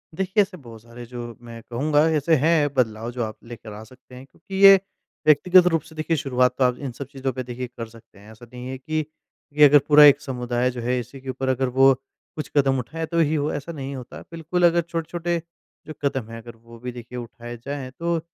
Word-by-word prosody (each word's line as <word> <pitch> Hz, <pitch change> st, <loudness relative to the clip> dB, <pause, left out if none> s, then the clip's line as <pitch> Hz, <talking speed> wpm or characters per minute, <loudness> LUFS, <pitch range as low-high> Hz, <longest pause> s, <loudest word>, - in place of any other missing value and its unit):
देखिए, 190 Hz, +4 st, +1 dB
ऐसे 195 Hz, -2 st, -3 dB
बहुत 115 Hz, -7 st, -13 dB
सारे 120 Hz, +1 st, -11 dB
जो 120 Hz, -1 st, -8 dB
मैं 115 Hz, -1 st, -10 dB
कहूँगा 145 Hz, +5 st, +2 dB
ऐसे 160 Hz, +3 st, +2 dB
हैं 155 Hz, -4 st, +3 dB
बदलाव 115 Hz, -3 st, -1 dB
जो 120 Hz, -1 st, -3 dB
आप 110 Hz, -1 st, -6 dB
लेकर 115 Hz, -2 st, -10 dB
आ 105 Hz, +1 st, -9 dB
सकते 125 Hz, +2 st, -17 dB
हैं। 130 Hz, +1 st, -11 dB
क्योंकि 190 Hz, +7 st, -12 dB
ये 195 Hz, 0 st, +11 dB, 0.5 s
व्यक्तिगत 175 Hz, +4 st, +6 dB
रूप 165 Hz, -, +2 dB
से 160 Hz, -1 st, -16 dB
देखिए 155 Hz, +1 st, -1 dB
शुरुआत 125 Hz, -3 st, +1 dB
तो 135 Hz, -, +2 dB
आप 125 Hz, -1 st, +2 dB
इन 140 Hz, -3 st, -5 dB
सब 135 Hz, +2 st, -8 dB
चीज़ 135 Hz, -1 st, -8 dB
पे 130 Hz, 0 st, -4 dB
देखिए 125 Hz, +1 st, -6 dB
कर 120 Hz, -2 st, -8 dB
सकते 110 Hz, -3 st, -18 dB
हैं। 105 Hz, +2 st, -15 dB
ऐसा 110 Hz, +2 st, -14 dB
नहीं 125 Hz, 0 st, -8 dB
है 130 Hz, 0 st, -5 dB
कि 155 Hz, +3 st, -3 dB, 0.5 s
ये 150 Hz, -, +9 dB
अगर 145 Hz, +1 st, +6 dB
पूरा 150 Hz, 0 st, +8 dB
एक 145 Hz, 0 st, +6 dB
समुदाय 125 Hz, -2 st, -1 dB
जो 120 Hz, -1 st, -7 dB
है 125 Hz, +1 st, 0 dB
इसी 125 Hz, +3 st, -9 dB
के 135 Hz, -, -8 dB
ऊपर 130 Hz, 0 st, -3 dB
अगर 130 Hz, 0 st, +1 dB
वो 135 Hz, 0 st, +7 dB, 0.4 s
कुछ 155 Hz, -, -5 dB
कदम 135 Hz, -2 st, +3 dB
उठाए 160 Hz, +6 st, -5 dB
तो 170 Hz, +1 st, -2 dB
ही 155 Hz, -1 st, +2 dB
वो 145 Hz, +1 st, -1 dB
ऐसा 145 Hz, +3 st, -5 dB
नहीं 140 Hz, -3 st, -6 dB
होता। 125 Hz, -2 st, -9 dB
बिल्कुल 165 Hz, +2 st, 0 dB
अगर 170 Hz, 0 st, +4 dB
छोटे-छोटे 170 Hz, +1 st, -3 dB, 0.5 s
जो 155 Hz, -, -6 dB
कदम 130 Hz, -5 st, -2 dB
हैं 115 Hz, -, -8 dB
अगर 120 Hz, 0 st, -12 dB
वो 115 Hz, +1 st, -16 dB
भी 125 Hz, +1 st, -5 dB
देखिए 120 Hz, 0 st, -9 dB
उठाए 120 Hz, 0 st, -8 dB
जाएँ 140 Hz, -2 st, -5 dB
तो 170 Hz, 0 st, 0 dB
130 Hz, 230 wpm, -23 LUFS, 120-155 Hz, 0.5 s, ये